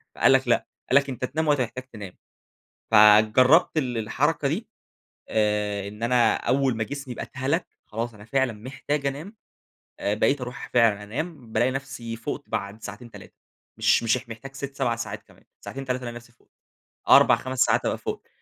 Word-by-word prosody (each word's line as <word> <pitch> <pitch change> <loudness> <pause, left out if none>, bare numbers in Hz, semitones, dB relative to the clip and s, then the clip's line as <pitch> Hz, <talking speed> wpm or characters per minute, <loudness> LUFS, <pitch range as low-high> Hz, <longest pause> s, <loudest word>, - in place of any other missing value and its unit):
فقال - - +4
لك 135 -1 +3
لأ، 120 - +2 0.2
قال 130 - +2
لك 140 0 +2
أنت 130 -1 -3
تنام 155 +5 -2
وقت 145 -2 +3
ما 125 - +2
تحتاج 120 +3 -8
تنام. 100 -4 -8 0.8
فجربت 110 +10 +6
ال 125 -5 -1
الحركة 140 +6 0
دي، 190 +10 -3 0.6
آآ 105 -2 0
إن 105 +2 -11
أنا 120 0 +3
أول 130 -2 +1
ما 115 - -1
جسمي 135 +1 -6
يبقى - - -5
اتهَلَك، 140 +6 -2 0.2
خلاص 115 +2 -4
أنا 105 0 -13
فعلًا 130 0 0
محتاج 135 +6 -4
أنام، 150 +10 -4 0.7
آآ 100 - 0
بقيت 135 +6 +1
أروح 125 +1 -7
فعلًا 115 -4 +3
أنام، 130 +2 -6
بالاقي 120 +4 +2
نفسي 130 -4 -5
فُقت 140 +5 -5
بعد 100 +2 -4
ساعتين، 105 +3 -9
3، - - -13 0.4
مش - - +3
مش 115 +2 +2
اح 125 -1 -11
محتاج 125 +5 -9
6، 140 0 -6
7 130 -4 0
ساعات 115 - -6
كمان. - - -22 0.2
ساعتين، 135 0 -7
3 130 0 -2
ألاقي 120 -1 -6
نفسي 120 0 -12
فُقت، 120 - -32 0.6
4، - - +8
5 130 0 -6
ساعات - - +3
أبقى - - 0
فُقت. - - -6
125 Hz, 185 wpm, -25 LUFS, 110-135 Hz, 0.8 s, 4